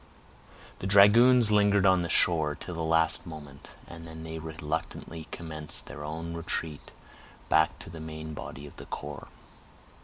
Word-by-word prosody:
The 95 - -4
dragoons 110 +4 +6
lingered 100 -1 +4
on 95 -2 +5
the 85 - -3
shore 80 -2 +3
till 90 - -8
the 85 - -4
last 80 +1 +1
moment, 75 -4 -10 0.2
and 80 -1 -11
then 80 0 -9
they 80 0 -6
reluctantly 80 0 -5
commenced 80 -2 -2
their 75 - -9
own 80 +2 -5
retreat 80 -2 -5 0.6
back 80 +1 +3
to - - -11
the 85 - -9
main 80 0 -7
body 70 -1 -8
of 70 - -13
the - - -10
corps. 75 -1 -7
80 Hz, 155 wpm, -28 LUFS, 80-85 Hz, 0.6 s, dragoons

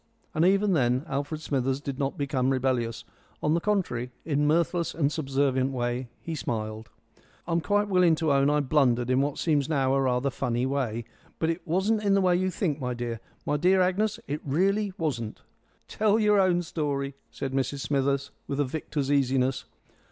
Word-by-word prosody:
And 155 - +2
even 195 +2 +3
then 125 -3 +2
Alfred 145 +3 -3
Smithers 135 -3 -1
did 140 -2 -5
not 140 -1 -1
become 135 -2 0
rebellious; 125 -3 0 0.4
on 150 - +2
the 170 - +2
contrary, 170 - -1 0.2
in 145 -2 0
a - - +2
mirthless 170 +2 +1
and 145 -3 +1
subservient 135 -3 0
way 120 -1 -2
he 165 - -6
smiled. 110 -5 -4 0.6
"I'm 170 0 0
quite 205 +3 +1
willing 180 -4 +4
to 155 -2 +1
own 140 +1 +3
I 150 0 +2
blundered 130 -4 +2
in 130 +1 +3
what 145 0 -1
seems 150 -4 +1
now 135 -3 +2
rather 130 0 +1
a - - -8
funny 120 0 -1
way. 125 -4 -2 0.3
But 160 0 +1
it 165 +1 -7
wasn't 195 +6 +1
in 200 -1 +3
the - - +4
way 180 -1 +3
you 185 +1 +1
think, 160 -5 -1
my 125 -1 -2
dear. 120 -1 -4 0.3
My 150 - +1
dear 185 +5 +4
Agnes, 190 +4 +1
it 145 +2 -3
really 195 +8 +1
wasn't." 125 - -3 0.4
"Tell 215 0 +2
your 210 -2 +4
own 180 -2 +3
story," 140 -4 -2 0.2
said 135 -1 -5
Mrs 135 +1 -1
Smithers, 140 0 0 0.2
with 140 - -3
a 145 - +3
victor's 145 0 -3
easiness. 135 -2 +1
140 Hz, 185 wpm, -27 LUFS, 130-170 Hz, 0.6 s, willing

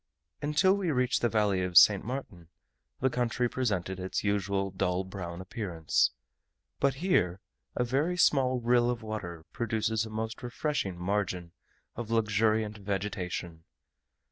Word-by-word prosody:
Until 150 +6 +3
we 195 -4 -1
reached 125 -4 +1
the 120 - +2
valley 105 -4 +2
of 90 -2 +1
St. 100 0 +8
Martin, 105 -10 -6 0.5
the 130 - +3
country 125 0 0
presented 100 -7 -2
its 95 0 -3
usual 100 -1 0
dull 90 0 0
brown 90 -2 -6
appearance; 90 - 0 0.7
but 140 -1 +2
here, 135 - +1 0.4
a - - +1
very 145 +9 0
small 130 -6 +3
rill 120 0 +3
of 120 -2 -3
water 85 -7 -6
produces 110 -1 0
a 110 - -6
most 110 +1 -4
refreshing 120 - -2
margin 90 -2 -2 0.4
of 115 -2 -5
luxuriant 110 -1 +1
vegetation. 95 -4 -4
110 Hz, 135 wpm, -29 LUFS, 95-125 Hz, 0.7 s, St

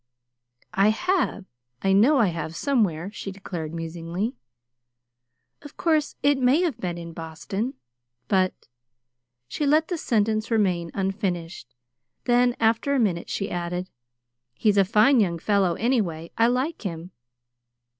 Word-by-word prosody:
"I 195 +1 +4
have, 360 - 0 0.4
I 195 0 +3
know 240 +10 +5
I 225 -7 +4
have 165 -1 -5
somewhere," 200 - 0
she 195 - -6
declared 175 -5 -6
musingly. 170 +6 -4 1.3
"Of 290 -1 -13
course 310 -3 +1
it 285 -1 +3
may 260 +6 +4
have 295 -10 -1
been 175 -4 -3
in 170 -1 -8
Boston; 170 - -4 0.5
but 185 -2 0 0.4
" 125 0 -57
She 290 - -2
let 310 +3 +3
the 350 -3 -2
sentence 215 -2 0
remain 185 -7 +1
unfinished; 185 - -3 0.5
then, 245 0 +3
after 230 +5 +2
a - - +2
minute 185 -7 0
she 195 - -3
added: 175 +1 -3 0.6
"He's 205 - +2
a 195 - +5
fine 225 +6 +4
young 175 -5 +1
fellow, 190 -1 +1
anyway. 180 -8 -1
I 230 +1 +4
like 260 +7 -1
him." 175 -3 -6
200 Hz, 135 wpm, -25 LUFS, 170-245 Hz, 1.3 s, know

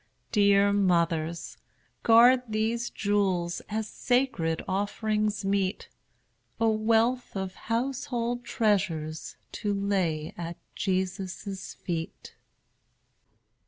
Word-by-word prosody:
Dear 200 -1 +4
mothers, 170 -4 +1 0.4
guard 240 +3 +7
these 225 +2 0
jewels 190 -4 0
As 220 0 -2
sacred 230 -12 0
offerings 210 +1 -1
meet, 195 0 0 0.7
A 225 - +3
wealth 225 +3 +2
of 190 -1 -3
household 245 0 -2
treasures, 185 -9 -1 0.2
To 205 - -2
lay 190 -6 0
at 170 0 -6 0.2
Jesus' 190 0 -3
feet. 165 -3 -5
200 Hz, 85 wpm, -28 LUFS, 185-225 Hz, 0.7 s, guard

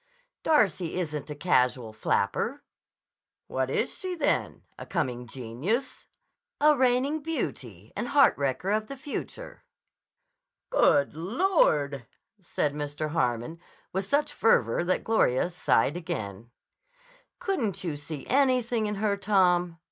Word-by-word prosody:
"Darcy 195 - +2
isn't 150 -4 -4
a 150 - -5
casual 125 -8 +1
flapper." 220 - -1 0.8
"What - - -2
is - - -1
she, 370 -2 -3
then? 330 - -1 0.2
A - - -6
coming 125 -8 -3
genius?" 135 - -3 0.5
"A 300 +1 +5
reigning 260 +3 +2
beauty 125 - -5
and - - -3
heart 280 +2 +5
wrecker 140 +7 -1
of 215 0 0
the 275 - -7
future." 295 - -7 1.1
"Good 145 - +4
Lord!" 160 - +1 0.3
said 150 -5 -2
Mr. 150 +1 -4
Harmon 125 0 -1 0.3
with 190 +1 -2
such 290 +6 +1
fervor 125 - +3
that 185 - 0
Gloria 175 - +2
sighed 170 -3 +2
again. 110 - -5 0.9
"Couldn't 225 - -2
you 165 -4 -2
see 145 -1 -7
anything 250 -4 +2
in 210 - -2
her, 205 0 0
Tom?" 180 -4 +2
180 Hz, 120 wpm, -27 LUFS, -, 1.1 s, A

